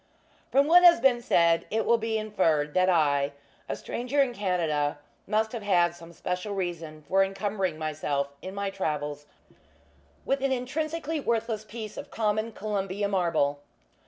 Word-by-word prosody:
From 275 +1 +4
what 350 +4 +6
has 345 -5 +8
been 245 -1 +3
said, 170 -7 +3
it 220 +1 0
will 235 0 +3
be 225 0 -1
inferred 165 -9 +1
that 185 0 +3
I 145 -4 +2 0.4
a - - -1
stranger 250 +4 -3
in 270 -3 +3
Canada 165 -9 0 0.3
must 220 +1 +1
have 235 - -5
had 175 -4 +3
some 170 -1 -13
special 180 +4 -4
reason 165 -5 -4
for 195 +1 +3
incumbering 195 -3 -2
myself 150 -3 -2
in 190 +1 -7
my 200 -1 -2
travels 150 -5 -3 1.0
with 275 0 0
an 275 0 +1
intrinsically 305 +5 -2
worthless 230 -4 -1
piece 215 0 -8
of - - -7
common 215 0 -1
Columbia 200 -1 -2
marble. 165 -7 +1
195 Hz, 155 wpm, -27 LUFS, 165-230 Hz, 1.0 s, has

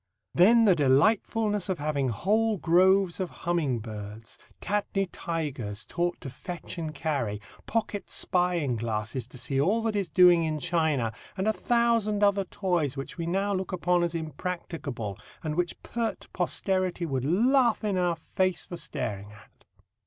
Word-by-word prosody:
Then 225 +6 +6
the 200 - +6
delightfulness 205 - +2
of 185 - 0
having 145 -3 -1
whole 215 - +1
groves 185 +2 +4
of 185 -2 -2 0.2
humming 165 -8 +1
birds, 110 0 -8 0.2
tatne 200 -1 -1
tigers 135 -10 -4
taught 175 0 -2
to 135 - -6
fetch 175 +5 -7
and 160 -2 -3
carry, 140 -9 -2 0.3
pocket 215 -2 -2
spying 175 -8 +1
glasses 110 +2 -3
to 125 - -12
see 135 +2 0
all 210 +9 +2
that 225 -2 0
is 195 -4 -1
doing 180 -2 +6
in 155 -1 -1
China, 155 -8 0 0.2
and 190 +2 0
a 220 - +3
thousand 230 -3 +1
other 200 -1 +3
toys, 175 -8 -1
which 135 +5 -6
we 165 - -2
now 195 +3 0
look 190 0 -2
upon 180 -1 +1
as 170 -1 -1
impracticable, 155 - -5 0.2
and 155 -2 -2
which 175 +2 -2
pert 235 -1 -3
posterity 185 0 -1
would 135 -5 -2
laugh 235 - +3
in 205 -2 0
our 175 -2 +1 0.2
face 185 -3 +1
for 175 - -7
staring 105 -9 -4
at. 105 - -19
175 Hz, 155 wpm, -28 LUFS, 140-195 Hz, 0.3 s, Then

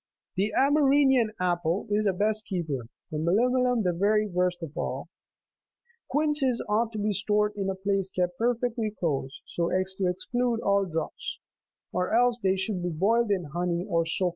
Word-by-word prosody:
The 200 +3 0
Amerinian 275 -4 +4
apple 175 0 0
is 210 +1 +2
the 195 - +2
best 215 +3 0
keeper, 155 - -3 0.2
the 155 - -2
melimelum 245 +7 +2
the 180 -2 +1
very 210 +4 +2
worst 180 -2 -1
of 155 -2 -7
all. - - -3
• - - -22
(17.) - - -30 1.0
Quinces 295 -4 +1
ought 220 +2 +1
to - - -4
be 210 0 0
stored 210 +1 +1
in 195 -1 -2
a 190 - -2
place 195 0 -1
kept 180 -1 -1
perfectly 235 -1 0
closed, 145 -9 -3
so 170 0 -2
as 185 +1 0
to 190 - +2
exclude 235 +6 -1
all 200 0 +2
draughts; 160 -2 -4 0.6
or 180 +4 0
else 245 0 +3
they 190 -1 +2
should 190 0 -2
be 175 - -1
boiled 210 +8 +2
in 195 -3 +1
honey 175 0 -1
26 - - -14
or 165 -1 +2
soaked 165 - 0
in 185 - +3
it. - - +2
200 Hz, 190 wpm, -27 LUFS, 180-230 Hz, 1.0 s, Amerinian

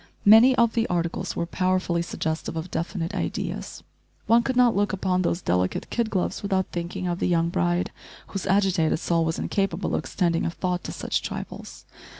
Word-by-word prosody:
Many 225 +5 +8
of 235 -2 +3
the 230 -1 +1
articles 170 -1 -2
were 170 - -1
powerfully 185 -1 0
suggestive 160 -1 -3
of 160 +3 -5
definite 170 +1 -3
ideas. - - -4 0.4
One 230 +1 +5
could 260 +2 -2
not 245 -1 +4
look 205 0 +1
upon 185 -1 0
those 170 0 -1
delicate 90 +1 0
kid 235 -2 0
gloves 190 -4 -1
without 190 -2 0
thinking 175 +1 -4
of 175 0 -2
the - - +1
young 170 -1 +2
bride, 175 +1 0 0.4
whose 195 - -4
agitated 190 -4 +2
soul 165 +1 +1
was 160 0 -1
incapable 195 -3 -1
of - - +2
extending 170 -3 0
a - - 0
thought 180 +1 -2
to - - -4
such - - -2
trifles. - - -7
180 Hz, 180 wpm, -25 LUFS, 170-200 Hz, 0.4 s, Many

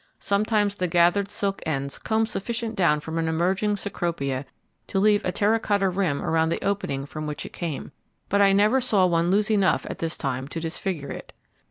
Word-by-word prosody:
Sometimes 205 0 +1
the 185 - 0
gathered 175 +4 +3
silk 200 -1 -2
ends 140 -3 -3
comb 220 0 +1
sufficient 230 +2 -3
down 160 -5 +3
from 160 +2 -4
an 165 - 0
emerging 185 +6 +1
Cecropia 165 -9 -3 0.4
to - - -3
leave 210 +1 +4
a 180 - 0
terra 210 +4 +2
cotta 200 -3 +1
rim 180 -6 -1
around 160 0 +2
the 165 - -2
opening 165 -9 -1
from 155 +1 -6
which 150 -1 -4
it - - -9
came; 165 -5 -5 0.4
but 200 +1 +2
I 200 -1 +6
never 210 +6 +4
saw 205 -6 +3
one 170 -1 +2
lose 210 +3 +2
enough 200 -3 +2
at - - -6
this 165 0 -2
time 130 0 -3
to 165 - -5
disfigure 165 -2 -3
it. - - -8
185 Hz, 195 wpm, -25 LUFS, 160-205 Hz, 0.4 s, I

